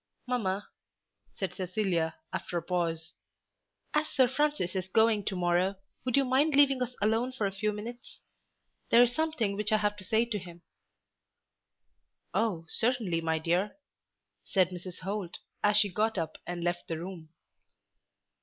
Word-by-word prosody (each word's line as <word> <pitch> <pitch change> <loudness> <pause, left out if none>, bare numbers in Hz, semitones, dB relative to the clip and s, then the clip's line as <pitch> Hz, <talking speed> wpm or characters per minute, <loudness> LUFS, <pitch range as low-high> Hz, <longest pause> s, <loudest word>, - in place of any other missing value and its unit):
"Mamma," 205 -6 -1 0.7
said 190 - -3
Cecilia 180 -3 -1 0.2
after 175 - -3
a 170 - -2
pause, 165 -2 -2 0.8
"as 300 0 +2
Sir 260 -3 +4
Francis 285 -8 0
is 185 -1 -1
going 220 +1 +3
to 195 - -1
morrow, 180 +2 +2 0.3
would 255 +1 +1
you 275 - +4
mind 275 +4 +3
leaving 275 -2 +5
us 250 0 -2
alone 225 +4 +2
for 240 -5 -2
a 195 - 0
few 210 +2 -1
minutes? 235 +5 -8 0.7
There 240 - +8
is 245 0 +2
something 310 -10 0
which 210 +1 -1
I 215 - +5
have 210 -1 +1
to 190 - -10
say 220 +4 +2
to 225 -3 -2
him." 175 -2 -12 1.7
"Oh, 200 -8 0
certainly, 220 -5 +1
my 160 -1 +1
dear," 175 - 0 0.7
said 185 -3 +2
Mrs. 180 0 -7
Holt, 190 -2 -3 0.3
as 210 0 +4
she 205 -1 +4
got 215 +2 +1
up 165 -3 -3
and 175 -1 -3
left 175 0 -1
the 165 - -2
room. 170 -2 -7
205 Hz, 155 wpm, -30 LUFS, 175-235 Hz, 1.7 s, There